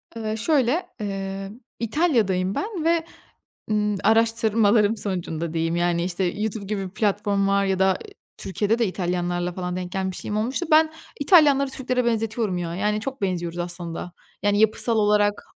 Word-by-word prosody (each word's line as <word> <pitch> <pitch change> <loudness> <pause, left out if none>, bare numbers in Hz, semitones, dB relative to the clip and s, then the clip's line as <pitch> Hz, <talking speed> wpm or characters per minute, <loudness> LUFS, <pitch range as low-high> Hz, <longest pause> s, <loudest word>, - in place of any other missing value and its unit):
Iıı, 220 -1 -3
şöyle, 280 +5 +1
ııı, 195 +1 -5 0.2
İtalya'dayım 225 - +1
ben 395 -6 -3
ve, 330 0 +2 0.7
ımm, 210 -1 +1
araştırmalarım 225 -1 +3
sonucunda 170 -5 -3
diyeyim, 165 0 0
yani, 175 0 +1
işte, 180 +1 -2
YouTube 210 +2 -3
gibi 195 -1 -3
bir 185 - -9
platform 205 -1 +1
var 200 0 +2
ya 190 -1 0
da, 190 - +4
ııı, 190 - +1 0.4
Türkiye'de 210 +4 -1
de 230 - +2
İtalyanlarla 175 -1 -2
falan 180 0 -4
denk 180 -1 -5
gelmişliğim 190 +2 -3
olmuştu. 255 +11 -1
Ben 315 0 +6 0.3
İtalyanları 285 -3 +5
Türklere 255 -2 -1
benzetiyorum 225 -4 0
ya, 170 -1 -3
yani 210 +3 0
çok 270 +2 -5
benziyoruz 175 -3 -2
aslında, 175 0 -4 0.3
yani 205 0 +2
yapısal 220 +1 +2
olarak 205 -1 +2
205 Hz, 150 wpm, -24 LUFS, 185-230 Hz, 0.7 s, Ben